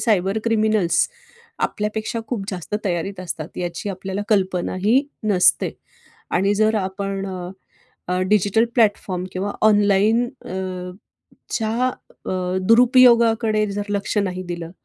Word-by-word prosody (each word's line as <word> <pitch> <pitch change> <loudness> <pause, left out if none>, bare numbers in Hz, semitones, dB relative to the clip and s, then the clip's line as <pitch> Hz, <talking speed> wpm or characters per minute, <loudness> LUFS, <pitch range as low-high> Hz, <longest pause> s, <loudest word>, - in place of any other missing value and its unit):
Cyber 195 -2 +1
criminals 215 -6 +2 0.6
आपल्यापेक्षा 215 +2 -3
खूप 225 -6 -3
जास्त 185 +1 -5
तयारीत 185 +1 -2
असतात. 170 -3 -5
याची 175 +2 -4
आपल्याला 190 +1 -4
कल्पनाही 195 +4 +1 0.2
नसते 195 -4 +3 0.6
आणि 195 +3 +2
जर 215 +1 +2
आपण 195 0 -3
अ, 180 -2 -6 0.6
अ, 180 0 0
डिजिटल 210 +2 +3
प्लॅटफॉर्म 200 -5 +1
किंवा 195 +2 -3 0.2
ऑनलाइन 205 +3 +3 0.2
अ, 185 -1 -5 0.6
...च्या 230 +3 0 0.4
अ, - - -2 0.4
दुरुपयोगाकडे 235 -3 +5
जर 205 +1 -2
लक्ष 200 +1 -2
नाही 185 -2 -1
दिलं, 170 -1 -5
200 Hz, 115 wpm, -21 LUFS, 185-220 Hz, 0.6 s, दुरुपयोगाकडे